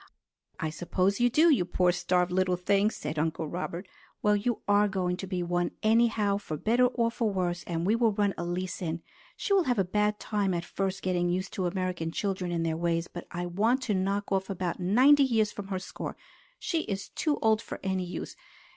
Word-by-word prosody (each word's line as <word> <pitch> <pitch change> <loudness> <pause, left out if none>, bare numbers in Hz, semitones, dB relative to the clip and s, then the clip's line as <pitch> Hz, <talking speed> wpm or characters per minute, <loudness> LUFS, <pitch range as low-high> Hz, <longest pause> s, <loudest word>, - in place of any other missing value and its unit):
"I 155 - -2
suppose 185 +5 0
you 245 0 +4
do, 315 +7 +5
you 255 -11 +3
poor 180 0 +2
starved 180 0 +1
little 185 0 +2
thing!" 200 +3 +2
said 150 -7 -5
Uncle 160 0 -1
Robert. 175 +3 -5 0.4
"Well, 210 0 +4
you 220 +3 -1
are 205 +1 +4
going 185 -2 -1
to 190 - -6
be 180 -2 -2
one 175 0 -1
anyhow, 215 -2 +3
for 155 -6 -5
better 240 +8 +3
or 235 -2 0
for 230 -1 0
worse, 175 -2 -1
and 170 -1 -2
we 210 +4 +3
will 230 -1 +3
run 205 -1 +1
Elise 175 +2 -3
in. 165 -1 -3 0.3
She 400 - 0
will 380 -4 +4
have 245 -2 +1
a 195 - +3
bad 210 +3 0
time 200 -3 0
at 170 0 -3
first 195 0 -3
getting 175 -1 +1
used 185 +2 -2
to 185 -2 -1
American 180 -2 -2
children 185 0 -2
and 165 -1 -1
their 160 -1 -1
ways, 170 0 0
but 175 - -9
I 175 +1 -4
want 220 +9 +1
to 220 - 0
knock 195 +2 -1
off 190 0 0
about 185 -2 -3
ninety 255 +11 +5
years 225 -6 +2
from 200 -1 -7
her 195 -1 -2
score. 185 - -6 0.4
She 330 -8 -1
is 200 -1 -4
too 300 -3 -1
old 220 -1 +3
for - - -7
any 190 -1 0
use. 175 - -6
190 Hz, 210 wpm, -29 LUFS, 175-210 Hz, 0.4 s, do